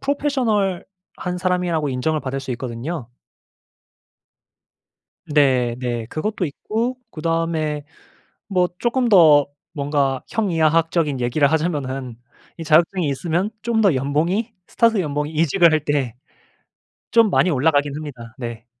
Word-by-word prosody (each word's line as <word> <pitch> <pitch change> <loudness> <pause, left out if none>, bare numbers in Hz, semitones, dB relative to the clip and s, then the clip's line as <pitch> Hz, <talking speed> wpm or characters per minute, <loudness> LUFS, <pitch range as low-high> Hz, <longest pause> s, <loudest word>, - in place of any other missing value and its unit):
프로페셔널한 205 -10 -2
사람이라고 180 -4 0
인정을 145 +4 -1
받을 135 0 -4
수 130 - -7
있거든요. 125 +3 -5 2.2
네. 130 -5 +2
네. 120 -2 -3
그것도 190 - -2
있고 225 - -3
그다음에 160 -2 -1 0.6
뭐 180 -3 +1
쪼끔 240 0 +1
더 155 -7 +6 0.3
뭔가 140 -2 0
형이하학적인 165 - +1
얘기를 135 +4 +2
하자면은 135 -6 -2 0.4
이 165 - -6
자격증이 165 +2 +3
있으면 170 +7 -1
좀 235 -2 +1
더 195 -5 +5
연봉이 160 - 0 0.2
스타트 230 -2 +2
연봉이 150 -2 -2
이직을 165 +2 +4
할 155 -2 +1
때 140 -6 -1 1.0
좀 230 -1 +5
많이 185 - +3
올라가긴 145 0 +2
합니다. 125 -6 -8
네. 120 -3 -7
155 Hz, 275 characters per minute, -21 LUFS, 140-185 Hz, 2.2 s, 더